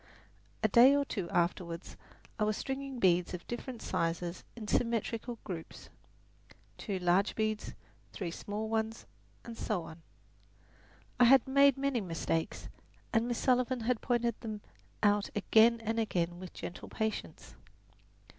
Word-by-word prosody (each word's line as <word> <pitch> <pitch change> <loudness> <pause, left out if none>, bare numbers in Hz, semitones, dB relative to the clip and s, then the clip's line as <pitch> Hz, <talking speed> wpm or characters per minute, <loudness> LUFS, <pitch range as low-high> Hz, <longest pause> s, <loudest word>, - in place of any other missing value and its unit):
A - - +6
day 245 +6 +7
or 285 0 +2
two 195 -10 -4
afterward 170 0 0 0.6
I - - +2
was 215 0 +1
stringing 270 0 -4
beads 180 -4 +2
of 175 - -9
different 240 0 -6
sizes 170 +1 -2
in 220 -3 -7
symmetrical 230 +1 -1
groups 170 -5 -7 0.9
two 200 -4 -3
large 180 +3 +2
beads, 215 -1 -2 0.4
three 180 -4 -4
small 210 +5 -4
ones, 220 0 -2 0.4
and 230 - -7
so 210 -6 -2
on. 160 +1 -11 1.2
I 245 - +8
had 265 +1 +6
made 280 0 +5
many 270 -3 0
mistakes, 165 -2 -2 0.5
and 230 0 +2
Miss 240 -1 -1
Sullivan 250 -1 +2
had 235 0 0
pointed 235 -2 0
them 215 -3 -5 0.4
out 205 -1 +3
again 225 +3 +5
and 225 +1 -1
again 175 -5 -1
with 185 -1 -8
gentle 175 - -7
patience. 220 0 -4
220 Hz, 135 wpm, -32 LUFS, 180-240 Hz, 1.2 s, I